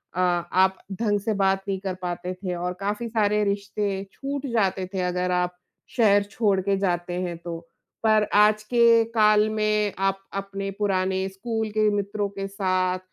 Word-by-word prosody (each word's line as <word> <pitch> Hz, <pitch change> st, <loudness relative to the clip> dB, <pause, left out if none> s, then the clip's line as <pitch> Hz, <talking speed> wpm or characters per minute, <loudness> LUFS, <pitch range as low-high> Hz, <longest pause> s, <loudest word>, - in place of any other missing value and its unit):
अ, -, -, -2 dB
आप 180 Hz, +2 st, +2 dB, 0.2 s
ढंग 205 Hz, -2 st, +2 dB
से 215 Hz, +2 st, -1 dB
बात 195 Hz, 0 st, +2 dB
नहीं 190 Hz, -1 st, -1 dB
कर 190 Hz, -1 st, -3 dB
पाते 180 Hz, +1 st, -3 dB
थे 180 Hz, -1 st, -4 dB
और 180 Hz, +1 st, -3 dB
काफ़ी 210 Hz, +4 st, -2 dB
सारे 210 Hz, -1 st, +2 dB
रिश्ते 200 Hz, -1 st, -2 dB
छूट 280 Hz, 0 st, -4 dB
जाते 190 Hz, -4 st, +1 dB
थे 185 Hz, -, -1 dB
अगर 180 Hz, 0 st, -1 dB
आप 180 Hz, 0 st, 0 dB, 0.4 s
शहर 205 Hz, -3 st, +5 dB
छोड़ 205 Hz, -1 st, 0 dB
के 200 Hz, +1 st, +1 dB
जाते 175 Hz, -2 st, -1 dB
हैं 175 Hz, -2 st, -3 dB
तो। 170 Hz, -1 st, -6 dB, 0.4 s
पर 215 Hz, -1 st, +4 dB
आज 215 Hz, +1 st, +5 dB
के 230 Hz, 0 st, +5 dB
काल 215 Hz, -1 st, +5 dB
में 215 Hz, -1 st, +1 dB
आप 195 Hz, 0 st, +1 dB
अपने 195 Hz, 0 st, -4 dB
पुराने 190 Hz, -1 st, 0 dB
स्कूल 220 Hz, +3 st, -3 dB
के 215 Hz, 0 st, +2 dB
मित्रों 205 Hz, 0 st, -1 dB
के 195 Hz, 0 st, -5 dB
साथ, 185 Hz, -2 st, 0 dB
195 Hz, 170 wpm, -25 LUFS, 185-210 Hz, 0.4 s, शहर